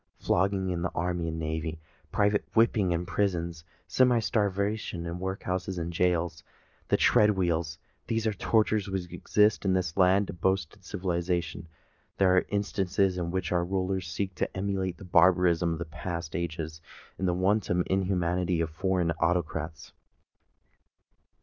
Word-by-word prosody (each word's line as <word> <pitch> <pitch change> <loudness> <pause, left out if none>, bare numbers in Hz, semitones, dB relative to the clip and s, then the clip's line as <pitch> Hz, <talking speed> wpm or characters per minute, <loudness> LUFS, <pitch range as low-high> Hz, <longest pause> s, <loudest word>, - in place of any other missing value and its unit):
Flogging 95 0 +1
in 85 -1 -2
the 85 - 0
Army 85 0 -1
and 80 0 -3
Navy, 80 0 -3 0.3
private 105 0 +2
whipping 110 -5 +3
in 85 +1 -1
prisons, 85 -4 -1 0.2
semi 125 -2 +4
starvation 100 -4 -1
in 85 +1 -4
workhouses 95 0 -3
and 85 0 -3
gaols, 85 -2 +1
and - - -39 0.4
the - - +4
tread 105 - +5
wheel,—these 85 +4 -2
are 110 - +2
the 100 - -9
tortures 110 -1 +2
which 90 -3 -4
exist 105 +4 +2
in 95 -2 +2
this 90 -3 -1
land 95 +1 +3
of 85 - -14
boasted 95 -2 0
civilisation—these 85 0 -3
are 90 0 +5
the - - -16
instances 95 -2 0
in 85 -1 -2
which 95 0 -2
our 90 -1 +2
rulers 95 0 -1
seek 95 +3 -3
to 90 - -3
emulate 95 -2 -2
the 95 - -11
barbarism 85 -2 +3
of 80 -2 -6
past 85 -1 -5
ages 80 -2 -4 0.4
and 95 - 0
the 90 - +1
wanton 95 -1 +1
inhumanity 90 -2 0
of 80 -1 -1
foreign 90 0 0
autocrats! 80 -2 -1
90 Hz, 150 wpm, -28 LUFS, 85-95 Hz, 0.4 s, tread